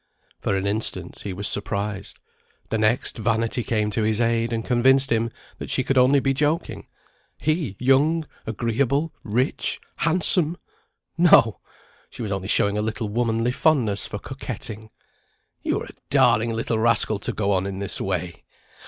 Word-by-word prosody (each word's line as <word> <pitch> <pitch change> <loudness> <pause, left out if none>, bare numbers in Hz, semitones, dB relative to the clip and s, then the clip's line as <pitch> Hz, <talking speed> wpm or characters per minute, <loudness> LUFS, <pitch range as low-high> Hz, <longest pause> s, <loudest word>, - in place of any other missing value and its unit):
For 95 - -1
an 95 - -2
instant 100 -4 0
he 100 - -6
was 100 +2 +1
surprised; 100 -1 -1 0.5
the 110 - 0
next, 110 +2 +1
vanity 115 +2 0
came 105 -2 -1
to 110 - -1
his 110 0 +1
aid, 115 0 +1
and 115 -1 -2
convinced 130 +2 +4
him 115 0 +1 0.3
that - - -6
she 130 - +2
could 135 +1 0
only 130 +2 +5
be 135 0 +1
joking. 150 +4 -1 0.5
He, 155 - -1
young, 145 +6 +2 0.2
agreeable, 130 +7 0
rich, 120 +6 -1 0.2
handsome! 170 0 +1 0.6
No! 135 - +5 0.5
she - - -7
was 105 - -4
only 95 -1 -3
showing 100 0 +3
a - - 0
little 110 0 -3
womanly 115 +1 0
fondness 125 -8 +1
for - - -5
coquetting. 110 -3 -7 0.7
"You're - - -1
a - - -13 0.2
darling 120 -5 +4
little 115 0 -1
rascal 110 -2 +2
to - - -3
go 100 -1 -1
on 95 0 +1
in 95 -1 -5
this 100 0 -5
way! 90 -2 -3
115 Hz, 155 wpm, -23 LUFS, 105-130 Hz, 0.7 s, only